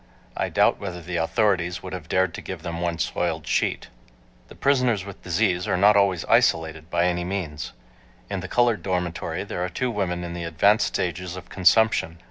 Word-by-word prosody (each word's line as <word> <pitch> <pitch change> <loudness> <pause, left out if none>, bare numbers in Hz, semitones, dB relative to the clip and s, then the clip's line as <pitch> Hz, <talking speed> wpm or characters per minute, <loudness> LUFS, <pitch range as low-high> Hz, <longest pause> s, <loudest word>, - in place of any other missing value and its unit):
I - - -1
doubt - - +3
whether 95 -3 -5
the 85 +1 -4
authorities 90 0 +1
would 95 - -7
have 85 -3 -7
dared 95 -2 +2
to - - -6
give - - -7
them 85 0 -4
one 85 -1 -1
soiled 80 -2 -2
sheet. - - -1 0.6
The - - -14
prisoners 125 -8 +2
with 100 -1 -10
disease 90 +1 0
are 95 - +1
not 105 +3 +6
always 100 -4 +2
isolated, 80 -1 +2
by 85 0 +2
any 90 -1 0
means. 80 -9 -4 0.5
In 100 -1 -3
the 90 - -6
colored 120 +1 +2
dormitory 90 -3 -2
there 90 - -4
are 90 - -2
two 125 +6 -2
women 90 -5 -2
in 85 0 -5
the 85 0 -5
advanced 85 +7 +3
stages 90 0 -3
of 90 -2 -10
consumption. 95 -3 +3
90 Hz, 190 wpm, -24 LUFS, 85-100 Hz, 0.6 s, not